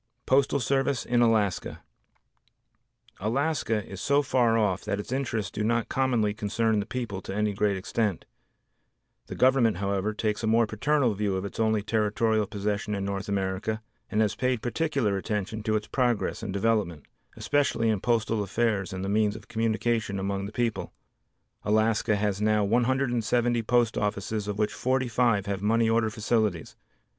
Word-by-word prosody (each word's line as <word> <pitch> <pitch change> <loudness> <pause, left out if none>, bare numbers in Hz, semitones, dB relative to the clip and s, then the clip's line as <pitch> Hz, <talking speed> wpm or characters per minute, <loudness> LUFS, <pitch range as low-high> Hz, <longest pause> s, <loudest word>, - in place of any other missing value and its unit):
Postal 140 +1 +3
Service 135 0 0
in 120 0 +2
Alaska 110 -5 +1 1.4
Alaska 115 -1 0
is 95 0 -8
so 140 +5 +2
far 120 -4 +2
off 100 -4 +1
that 100 - -2
its 105 - -7
interests 120 -6 -2
do 105 - -3
not 115 +1 0
commonly 120 -6 +1
concern 110 +1 0
the 100 - -3
people 115 -7 -4
to 95 - -6
any 105 0 0
great 100 0 +1
extent. 105 -1 -2 1.0
The - - -6
Government, 125 -6 +3
however, 100 +1 -1
takes 110 0 -1
a 110 - -1
more 115 +1 +4
paternal 125 +3 +1
view 100 -1 -1
of 95 - -4
its 100 - -7
only 110 -2 +2
territorial 110 0 +1
possession 105 0 -2
in 100 -1 -3
North 100 +1 -4
America, 100 +2 -1 0.3
and 110 - +1
has 105 -2 +2
paid 125 -3 -1
particular 130 -6 0
attention 105 +1 -3
to 110 0 0
its 105 0 -1
progress 120 -5 0
and - - -4
development, 100 -6 0 0.3
especially 140 -6 +1
in 110 -3 +1
postal 115 -2 +1
affairs 105 -1 -1
and 95 0 -4
the - - -3
means 105 0 +1
of 110 - -11
communication 110 -2 0
among 100 0 -2
the - - -8
people. 120 0 -2 0.7
Alaska 110 +1 +2
has 105 -1 -1
now 105 0 +3
170 120 +1 +1
post 115 0 +2
offices 105 0 -2
of 105 -1 -3
which 105 0 0
45 125 -5 +1
have 100 -1 -3
money 115 +2 +2
order 115 0 +2
facilities. 110 -5 -1
110 Hz, 160 wpm, -27 LUFS, 100-120 Hz, 1.4 s, more